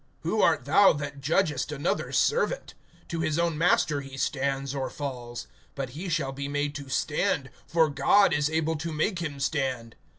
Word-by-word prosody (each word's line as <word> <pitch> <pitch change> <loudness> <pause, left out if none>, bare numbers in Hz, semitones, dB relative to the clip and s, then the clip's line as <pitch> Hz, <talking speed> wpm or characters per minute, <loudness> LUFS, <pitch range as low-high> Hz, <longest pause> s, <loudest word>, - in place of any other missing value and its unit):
(4)Who 210 +6 +1
art 155 -7 +3
thou 195 +8 +6
that 145 -1 -6
judgest 150 0 +1
another's 145 -1 -1
servant? 485 +2 +1 0.4
To 170 - -3
his 155 -1 0
own 170 -1 +1
master 150 -3 +2
he 135 -1 -10
stands 135 0 -1
or 135 -2 -2
falls. 120 -4 -6 0.3
But 135 -3 -4
he 170 +8 -6
shall 140 -5 0
be 140 +1 -5
made 145 0 -1
to 140 -2 -7
stand; 145 -1 0 0.2
for 165 -1 +3
God 175 +6 +4
is 145 0 +1
able 160 0 0
to 165 +2 -4
make 170 +5 0
him 150 -5 -4
stand. 130 -6 -2
145 Hz, 175 wpm, -27 LUFS, 135-165 Hz, 0.4 s, thou